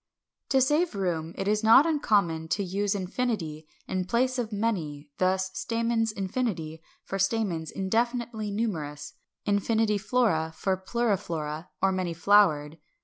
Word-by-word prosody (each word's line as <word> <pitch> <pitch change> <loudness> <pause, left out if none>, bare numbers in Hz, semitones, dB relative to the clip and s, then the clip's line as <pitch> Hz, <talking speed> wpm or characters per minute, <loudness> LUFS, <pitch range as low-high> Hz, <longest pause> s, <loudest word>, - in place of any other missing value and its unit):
582. 270 - +3
To 260 0 +4
save 310 -2 +1
room 165 -3 -2
it 195 - -2
is 210 +1 +1
not 230 +6 +7
uncommon 200 - +1
to 200 +5 0
use 200 +2 -1
∞ 185 -6 -2 0.2
in 185 -1 -1
place 255 +4 +1
of 230 -2 -2
"many;" 170 -9 -2
thus, 185 0 +1
"Stamens 230 -1 0
∞," 185 -6 -2 0.2
for 195 - -4
stamens 195 -5 0
indefinitely 225 +2 -1
numerous: 155 -9 -3 0.3
"∞ 210 +1 +1
flora" 195 -8 +1
for 190 -1 +1
pluriflora 185 -7 -2 0.2
or 195 - +4
many 185 -3 -2
flowered. 165 -5 +3
200 Hz, 135 wpm, -27 LUFS, 165-230 Hz, 0.3 s, not